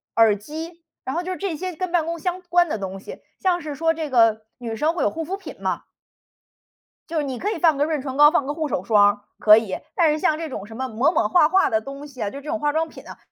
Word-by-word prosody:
耳 225 -2 +5
机。 320 - -8 0.2
然 265 +6 -3
后 - - +1
就 370 +1 -4
是 - - -6
这 385 -6 -3
些 365 +2 -5
跟 365 +1 -3
办 345 -3 +2
公 335 +1 -3
相 360 +2 -3
关 350 -1 +2
的 225 - -1
东 195 0 -5
西， - - -10 0.2
像 360 -2 +1
是 300 -2 -6
说 325 +3 +1
这 315 -2 -4
个 225 -3 +3
女 230 -2 -5
生 305 +8 +1
会 345 - -1
有 - - +3
护 325 0 -4
肤 370 +5 -3
品 395 - -9
嘛。 - - -2 1.3
就 325 -2 0
你 265 -4 -4
可 405 - -2
以 430 - -2
放 320 -3 +3
个 285 - +2
润 310 -3 -1
唇 265 -1 -5
膏、 295 +1 +8
放 285 - +1
个 290 - -2
护 310 -1 -2
手 185 - -2
霜， 205 0 +4 0.2
可 215 0 +8
以。 220 -4 -1 0.2
但 330 -3 +4
是 305 - -1
像 310 0 +2
这 325 -1 -5
种 205 -7 -6
什 225 +1 -11
么 260 0 -2
抹 245 +7 +1
抹 - - +1
画 345 -4 +4
画 380 +2 +3
的 220 0 +1
东 275 +4 -8
西 260 -4 -11
啊， 205 - -1
就 275 - -8
这 290 +2 -9
种 325 - -1
化 295 0 +1
妆 320 +2 0
品 - - -13
啊， - - -10
300 Hz, 300 characters per minute, -23 LUFS, 235-335 Hz, 1.3 s, 膏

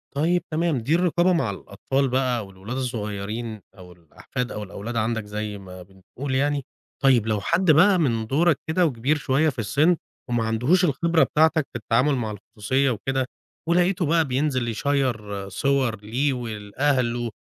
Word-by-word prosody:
طيب، 170 +4 +1
تمام، 160 -1 +1
دي 125 +7 +1
الرقابة 175 +1 +2
مع 165 -10 +1
الأطفال 130 +8 -2
بقى 125 -3 0
والولاد 95 +6 -7
الصغيرين 110 -2 -4 0.2
أو 90 -1 -12
الأحفاد 90 - -6
أو 105 - -5
الأولاد 105 +4 -7
عندَك 115 -1 -1
زي 105 0 -4
ما 95 -2 -11
بنقول 100 +9 -7
يعني. 140 0 0 0.4
طيب، 125 -5 +4
لو 105 -2 0
حد 170 - +3
بقى 180 +6 +6
من 115 -8 0
دورَك 155 +4 +2
كده 175 +3 +2
وكبير 140 +1 0
شوية 145 +2 +2
في 130 - -6
السن، 145 - +2 0.3
وما 120 -1 +1
عندهوش 125 - +2
الخبرة 165 +2 +2
بتاعتَك 160 -1 +2
في - - -23
التعامل 125 +6 +2
مع 115 -4 -2
الخصوصية 105 +6 -1
وكده، 130 +3 -1 0.4
ولقيته 175 +1 +2
بقى 165 +1 +3
بينزل 130 -2 0
يشيّر 110 -6 -1
صور 125 +1 0
ليه 125 +7 0
ولأهله، 120 +1 -1
130 Hz, 155 wpm, -24 LUFS, 110-150 Hz, 0.4 s, بقى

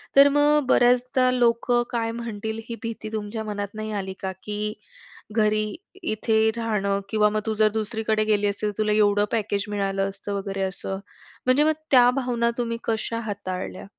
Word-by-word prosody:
तर 280 +1 +8
मग 290 0 +3
बऱ्याचदा 250 +1 +4
लोकं 240 0 +2
काय 230 -1 -1
म्हणतील, 220 -1 -5
ही 235 - -3
भीती 225 -1 -5
तुमच्या 220 +1 -3
मनात 205 -1 -4
नाही 215 0 -4
आली 190 0 -6
का? 190 -1 -2
की 210 0 -3 0.6
घरी 215 -1 +2 0.4
इथे 220 -3 +2
राहणं 200 -3 0
किंवा 210 -1 +3
मग, 215 - 0
"तू 220 - 0
जर 215 - +6
दुसरीकडे 220 0 0
गेली 210 -1 +2
असती, 205 +1 -1
तर - - -1
तुला 215 -1 +1
एवढं 205 -1 +3
पॅकेज 205 -3 0
मिळालं 195 -1 -1
असतं," 200 +1 -4
वगैरे 195 0 -3
असं. 190 0 -2 0.5
म्हणजे 255 +3 +4
मग 315 +1 +3 0.2
त्या 245 -2 +7
भावना 235 -2 0
तुम्ही 230 -1 -1
कशा 230 +1 -1
हाताळल्या? 185 - -5
215 Hz, 165 wpm, -24 LUFS, 205-235 Hz, 0.6 s, तर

